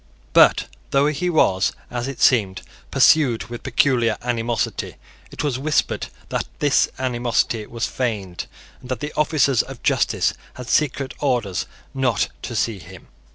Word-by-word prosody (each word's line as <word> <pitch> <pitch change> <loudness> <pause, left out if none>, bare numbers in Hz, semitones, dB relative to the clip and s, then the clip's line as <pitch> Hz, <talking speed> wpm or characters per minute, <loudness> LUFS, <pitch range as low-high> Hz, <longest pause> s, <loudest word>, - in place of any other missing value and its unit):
But, - - +6 0.2
though 140 +1 +3
he 150 +4 0
was, 95 - +2 0.2
as 120 +1 -3
it 140 - -6
seemed, 100 -7 +3 0.3
pursued 135 -8 +4
with 120 0 -7
peculiar 120 -3 +2
animosity, 120 -1 -2 0.3
it - - -5
was 135 -4 -1
whispered 150 +2 0 0.2
that - - -2
this 145 -2 +3
animosity 120 -3 0
was 115 -1 -3
feigned, 105 -8 -3 0.3
and 125 - -13
that 130 - -2
the 150 +1 -5
officers 145 -5 +3
of - - -10
justice - - +2 0.2
had 125 -2 -8
secret 140 -2 +1
orders 120 -10 0 0.3
not 130 -5 +1
to - - -5
see 110 -4 0
him. 90 +1 -13
125 Hz, 145 wpm, -22 LUFS, 115-140 Hz, 0.3 s, But